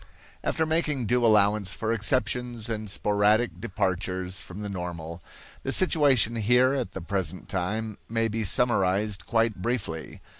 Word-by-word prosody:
After 160 - 0
making 155 -5 0
due 120 +2 +2
allowance 105 -3 +3
for 110 0 -1
exceptions 115 +1 -1
and 110 -2 -3
sporadic 105 -2 +1
departures 95 -2 -2
from 95 +3 -9
the 105 - -4
normal, 85 -3 -6 0.4
the 135 - -3
situation 135 - +3
here 125 +4 +4
at 130 -4 -2
the 95 - -5
present 95 -1 -3
time 105 +3 -3
may 115 0 +1
be 110 0 -2
summarized 105 -2 +1
quite 115 -4 +1
briefly. 100 -9 -3
105 Hz, 140 wpm, -26 LUFS, 95-120 Hz, 0.4 s, here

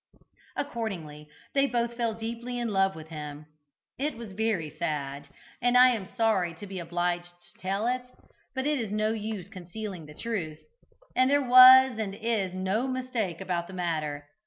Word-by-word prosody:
Accordingly 180 - -5 0.2
they 275 0 +3
both 235 -1 -1
fell 235 -2 -1
deeply 235 +2 -5
in 240 -1 -1
love 195 -1 +2
with 160 0 -10
him. 150 -1 -7 0.5
It 295 0 -1
was 230 -3 -8
very 205 -5 0
sad, 145 -2 -3 0.3
and 245 +1 +4
I 255 +1 +9
am 220 -6 -2
sorry 200 -8 +1
to 185 - -9
be 190 -2 -6
obliged 175 +1 -1 0.2
to 175 0 -23
tell 195 +3 -1
it, 250 +1 -1 0.5
but 265 0 -1
it 295 -1 +1
is 225 -3 -3
no 215 +1 +1
use 215 -4 -4
concealing 185 -2 -7
the 150 - -12
truth, 175 -10 -3 0.6
and 255 +1 +4
there 285 -2 +2
was 255 -1 +9
and 200 -3 -3
is 215 -4 -1
no 190 +7 -1
mistake 250 -9 -2
about 175 -2 -2
the 190 - -10
matter. 155 -5 -2
205 Hz, 170 wpm, -28 LUFS, 175-240 Hz, 0.6 s, I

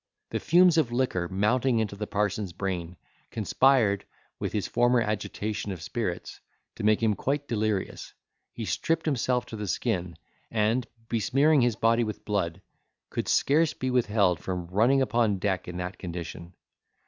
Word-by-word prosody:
The - - -1
fumes 175 0 +5
of 155 - +2
the 120 - -5
liquor 105 -9 0
mounting 115 +6 +2
into 110 -3 -1
the 105 +1 -5
parson's 100 -2 -1
brain, 90 -2 -4 0.3
conspired, 110 -2 +3 0.4
with - - -2
his 105 - -1
former 120 0 +3
agitation 105 -1 -2
of 95 - -5
spirits, 90 +2 -4 0.4
to - - -5
make 110 +1 +3
him 110 -2 +3
quite 145 +6 -2
delirious; 110 -3 -2 0.4
he 115 - -6
stripped 160 - 0
himself 125 -4 +1
to - - -8
the 105 -1 -5
skin; 90 -5 -2 0.3
and, 115 +3 +1 0.2
besmearing 135 +7 +3
his 120 -2 +2
body 115 +1 +3
with 110 -2 -5
blood, 100 -6 -2 0.5
could - - -3
scarce 155 +2 +3
be 130 0 -2
withheld 105 -8 +2
from 90 +1 -4
running 125 +8 +4
upon 115 -4 +1
deck 95 -1 -1
in 90 0 -6
that 90 +2 -5
condition. 85 0 -7
110 Hz, 160 wpm, -27 LUFS, 95-125 Hz, 0.5 s, fumes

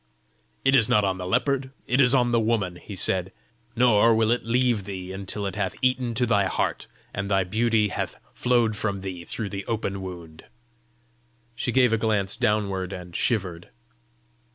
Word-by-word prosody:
"It 135 0 +5
is 115 -5 +4
not 105 -1 +4
on 95 -1 -1
the 90 - -4
leopard; 130 +5 0 0.2
it 125 +3 +2
is 130 0 +5
in 125 -2 +2
the 120 - +3
woman!" 110 -6 0
he 100 - -9
said. 95 +1 0 0.4
"Nor 115 -2 +5
will 110 0 +2
it 120 - +1
leave 120 -3 +1
thee 95 -2 -6
until 100 +1 -4
it 100 - -3
hath 100 -2 -2
eaten 125 -2 +1
to 125 +2 +2
thy 100 -4 +2
heart, - - -2 0.3
and 100 0 -3
thy 95 -1 +3
beauty 110 +2 +1
hath - - -4
flowed 120 -3 +1
from 100 -2 -2
thee 95 -3 -6
through 110 +2 -4
the 100 -1 -5
open 100 -4 -2
wound!" 85 -4 -9 1.1
She 120 +1 -2
gave 125 -2 +4
a 115 - +2
glance 105 -3 0
downward, 105 -5 0
and 90 -2 -9
shivered. 90 -7 -1
105 Hz, 175 wpm, -25 LUFS, 95-120 Hz, 1.1 s, It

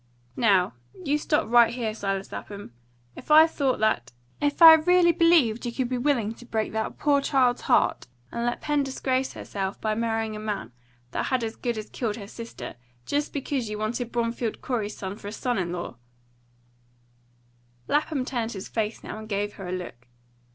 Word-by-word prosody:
"Now, 195 -5 +3 0.3
you 295 +1 +1
stop 300 -5 +1
right 235 0 +6
here, 235 -3 -2
Silas 195 -2 -3
Lapham! 200 - -8 0.4
If - - -12
I 310 +1 +9
thought 280 -5 0
that 215 - +1 0.3
if 290 0 0
I 325 -1 +12
really 345 +2 +5
believed 330 -10 +3
you 240 - -2
could 245 0 -2
be 255 - -1
willing 240 -5 +1
to 240 - -14
break 220 -2 -1
that 220 0 -3
poor 285 -2 +3
child's 255 -3 +2
heart, 120 - +2 0.2
and 235 - -3
let 240 0 -1
Pen 295 -1 +1
disgrace 265 -1 -1
herself 195 -1 -4
by 215 -1 0
marrying 225 -1 -1
a - - -6
man 210 - -4 0.4
that - - -2
had 255 -2 0
as 225 0 -3
good 240 -2 -3
as 215 0 -7
killed 225 -4 -2
her 210 -3 -8
sister, 205 - -8 0.3
just 290 +1 -1
because 275 -4 -2
you 210 - -4
wanted 230 +3 -3
Bromfield 235 -1 -2
Corey's 220 -5 -3
son 190 +1 -5
for 200 - -9
a - - -5
son 245 +1 -1
in 175 -2 -2
law 175 -8 -5 0.9
" 120 0 -37
Lapham 295 -3 0
turned 235 -3 -2
his 190 -1 -7
face 220 -1 -2
now, 215 - -6
and 220 0 -10
gave 205 0 -1
her 195 - -8
a - - -4
look. 170 -10 -6
225 Hz, 190 wpm, -26 LUFS, 200-260 Hz, 0.9 s, I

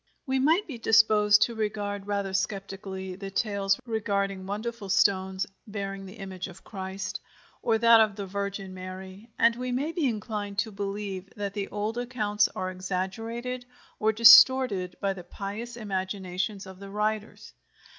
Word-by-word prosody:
We 265 -1 0
might 320 +9 +3
be 265 -7 -7
disposed 215 -2 +5
to 235 - -1
regard 205 -2 -3
rather 200 -2 -2
sceptically 195 -1 -3
the 195 +1 -7
tales 195 -1 0
regarding 200 -4 -1
wonderful 215 0 -4
stones 190 -1 +2 0.2
bearing 195 -2 -5
the 190 - -11
image 190 -3 -6
of 185 0 -13
Christ, 190 -1 -5 0.4
or 225 -1 +2
that 230 0 +7
of 215 -2 +2
the 200 -1 -5
Virgin 200 0 -4
Mary, 185 +3 -9
and 230 0 +4
we 250 +1 -3
may 275 +6 -1
be 330 -4 0
inclined 210 -3 -3
to 220 +1 0
believe 195 -1 -4
that 200 -1 -4
the 200 -1 -3
old 210 +3 -3
accounts 210 -4 +1
are 185 0 -2
exaggerated 225 +7 -4 0.4
or 215 0 +3
distorted 230 -4 +7
by 195 -1 +1
the 185 -2 -9
pious 215 +6 -6
imaginations 190 -1 -3
of 190 -1 -11
the 200 0 -9
writers. 210 +1 -3
205 Hz, 155 wpm, -27 LUFS, 195-225 Hz, 0.4 s, that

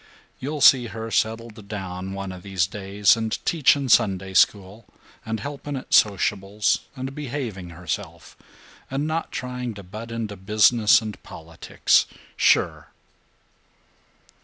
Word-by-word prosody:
You'll 145 +2 -4
see 125 -3 +6
her 115 0 -7
settled 110 -2 -2
down 95 -2 -6
one 100 -1 -5
of 90 -1 -9
these 95 -2 0
days, 100 +2 +2
and 110 -1 -2
teaching 145 -3 +3
Sunday 95 -4 +2
School 100 +3 +1 0.4
and 110 0 -4
helping 145 0 -6
at 130 - -8
sociables 100 0 +2 0.2
and 135 0 -5
behaving 125 -10 -5
herself, 85 -2 -6 0.5
and 135 +2 -2
not 160 +1 -3
trying 125 -2 -5
to 100 - -10
butt 110 +5 -9
into 115 -3 -4
business 105 +3 +4
and 105 -2 -7
politics. 80 0 0 0.3
Sure!" - - +2
110 Hz, 125 wpm, -23 LUFS, 95-125 Hz, 0.5 s, see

